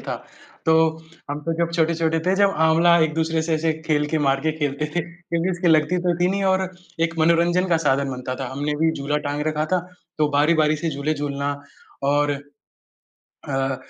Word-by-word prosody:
था, - - -4 0.5
तो 160 - +5 0.6
हम 145 - -3
तो 165 +2 -1
जब 170 0 +1
छोटे-छोटे 165 0 +1
थे 185 - +3
जब 200 0 +4 0.2
आँवला 170 +2 +5
एक-दूसरे 160 +1 +1
से 160 0 0
ऐसे 160 +1 +1
खेल 150 -2 +1
के 160 - 0
मार 135 0 +2
के 155 +1 0
खेलते 145 0 -1
थे 175 - +2
क्योंकि 170 +1 -3
उसकी 175 -1 0
लगती 155 +2 +3
तो 175 - +3
थी 180 - +3
नहीं 200 0 -1
और 190 -1 +2 0.3
एक 165 0 +1
मनोरंजन 170 +3 +3
का 170 - +3
साधन 135 0 +2
बनता 130 0 -4
था, 130 0 -5
हमने 145 +2 -2
भी 160 - +4
झूला 145 -1 -2
टाँग 145 +1 -2
रखा 155 0 -1
था, 185 - +4 0.4
तो 150 -1 +3
बारी-बारी 155 +1 +3
से 160 +1 -2
झूले 140 +2 -2
झूलना 145 -1 -2 0.6
और 145 0 +2 1.2
अ, 135 0 0
160 Hz, 190 wpm, -22 LUFS, 145-170 Hz, 1.2 s, तो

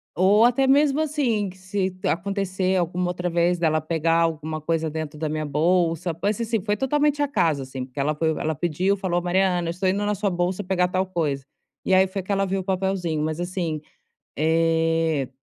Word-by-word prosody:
ou 200 +5 +5
até 255 +2 +3
mesmo 285 +1 +4
assim, 255 -10 0
que 185 - -13
se 190 0 -2
acontecer 190 +1 -1
alguma 180 +1 -1
outra 180 0 -2
vez, 175 +1 +2
dela 155 -2 +1
pegar 165 +1 +1
alguma 160 -1 -1
coisa 160 +1 -1
dentro 155 -1 -5
da 155 - -2
minha 155 0 -2
bolsa, 165 +3 +1
pode 200 +6 -1
ser 235 - -3
assim, 225 -2 -1
foi 210 +1 -1
totalmente 290 +3 +1
acaso, 165 - +1
assim, 130 0 -6
porque 130 +2 -9
ela 150 +2 +1
foi, 160 +1 0
ela 160 0 -1
pediu, 175 +5 0
falou: 185 -3 -1
"Mariana, 180 -1 +1
estou 185 +2 0
indo 200 +2 0
na 210 - +1
sua 205 0 -1
bolsa 180 +2 -1
pegar 180 -1 +1
tal 185 +1 -1
coisa". 155 -7 -2 0.4
E - - +1
aí 190 0 +6
foi 190 +1 -4
que 190 +2 -6
ela 195 0 +2
viu 195 0 -1
o - - -8
papelzinho, 185 -4 -1
mas 155 +1 -2
assim, 175 -4 -3 0.6
eh 165 -2 +1
180 Hz, 200 wpm, -24 LUFS, 160-195 Hz, 0.6 s, aí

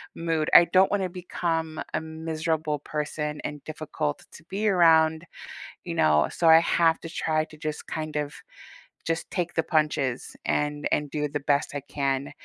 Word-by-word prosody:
mood, 165 -2 -1
I 175 - +10
don't 185 +3 +4
wanna 195 -2 +1
become 165 -3 -3
a - - 0
miserable 160 -1 -2
person 150 +1 -4
and 150 -1 -6
difficult 155 -1 -4
to 155 - -13
be 205 +3 -1
around, 160 -3 +4 0.6
you - - -4
know? 75 -2 +3
So, 165 - +1
I 160 - +9
have 165 -1 +2
to 165 - -7
try 155 -1 0
to 155 - -15
just, 155 -1 -5
kind 155 -1 -4
of 150 0 -2 0.7
just 165 0 -2
take 175 -1 -2
the 160 - +2
punches 150 -5 0
and 150 0 0
and 150 -1 0
do 150 -1 -1
the 145 +1 -3
best 140 0 0
I 145 - -2
can, 140 -1 -2
155 Hz, 170 wpm, -26 LUFS, 150-165 Hz, 0.7 s, I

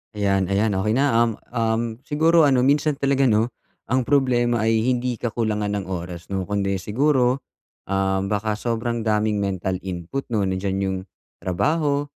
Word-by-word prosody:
Ayan, 100 -2 +1
ayan 100 +4 +1
okey 105 +3 +1
na. 140 +4 +2
Um, 115 0 +3 0.2
um 115 -1 0 0.2
siguro 160 +2 +4
ano, 130 -3 +4
minsan 145 +3 +3
talaga 140 -1 +1
'no, 110 -1 +3 0.4
ang 130 0 +1
problema 120 -4 +2
ay 115 0 +2
hindi 125 -1 0
kakulangan 110 -3 -1
ng 100 -2 -2
oras 90 -1 -6
'no, 95 -1 -2
kundi 100 0 -1
siguro, 130 +5 +1 0.5
um, 95 0 0
baka 105 +1 0
sobrang 115 +2 -2
daming 105 -1 +1
mental 95 -1 -2
input, 90 +7 -4
'no? 105 -4 +1
Nandiyan 95 +1 -1
yung 95 0 -1 0.4
trabaho, 145 - 0
110 Hz, 150 wpm, -23 LUFS, 100-130 Hz, 0.5 s, siguro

